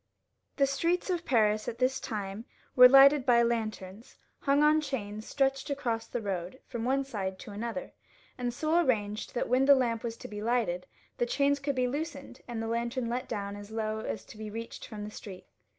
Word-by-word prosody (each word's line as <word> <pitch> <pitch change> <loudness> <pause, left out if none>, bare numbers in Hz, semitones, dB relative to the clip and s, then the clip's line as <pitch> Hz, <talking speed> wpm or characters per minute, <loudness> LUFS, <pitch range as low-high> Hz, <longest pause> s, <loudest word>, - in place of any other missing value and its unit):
The 280 - +4
streets 335 +7 0
of 350 -1 -2
Paris 215 -4 +2
at 230 - -4
this 260 +1 +1
time 205 0 -5 0.3
were 250 0 +10
lighted 275 +1 +8
by 240 -2 +5
lanterns 220 -2 -3 0.2
hung 280 +1 +3
on 305 +1 +5
chains 215 -7 -5
stretched 270 0 0
across 235 -5 -2
the 240 - -4
road 190 +4 -4
from 235 -3 -5
one 270 +2 +2
side 195 -7 -4
to 205 - -10
another, 230 +6 -5 0.4
and 245 -1 -2
so 315 +7 +2
arranged, 210 -5 -1
that - - 0
when 255 +2 +3
the 280 0 +8
lamp 235 -4 0
was 230 -1 -4
to - - -9
be 210 0 -7
lighted 220 -6 0 0.3
the 240 - +1
chains 280 +2 +2
could 280 0 -2
be 255 -1 +1
loosened 280 -2 -5
and 230 -2 -4
the - - -3
lantern 235 +1 -2
let 245 +2 -2
down 205 -1 -4
so 215 +2 -11
low 220 -1 -1
as 220 - -5
to 215 - -13
be 215 -1 -5
reached 230 +2 -7
from 210 -2 -7
the 210 - -6
street. 195 -3 -10
235 Hz, 200 wpm, -30 LUFS, 215-270 Hz, 0.4 s, were